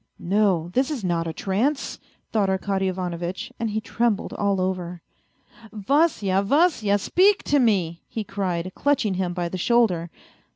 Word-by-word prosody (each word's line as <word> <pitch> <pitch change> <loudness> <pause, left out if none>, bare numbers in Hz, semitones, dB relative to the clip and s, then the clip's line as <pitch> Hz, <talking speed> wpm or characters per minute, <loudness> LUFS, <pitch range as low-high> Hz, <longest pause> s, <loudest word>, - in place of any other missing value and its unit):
" - - -46 0.2
No, 185 -6 +2
this 260 +3 +2
is 280 -8 -4
not 170 -2 0
a - - -2
trance," 225 - -1 0.3
thought 205 -3 +1
Arkady 190 0 0
Ivanovitch, 180 -1 -4
and 230 -1 -1
he 215 +1 -1
trembled 225 -1 -1
all 200 -2 0
over. 180 -2 -3 0.4
" 225 -3 -20
Vasya, 215 - +1
Vasya, 220 - +2
speak 385 - +3
to 285 - +2
me," 185 -9 +1
he 220 - -4
cried, 185 -3 -3
clutching 270 -8 +1
him 185 -1 -1
by 175 -1 -2
the 185 +2 -5
shoulder. 185 -6 +2
195 Hz, 160 wpm, -24 LUFS, 180-230 Hz, 0.4 s, speak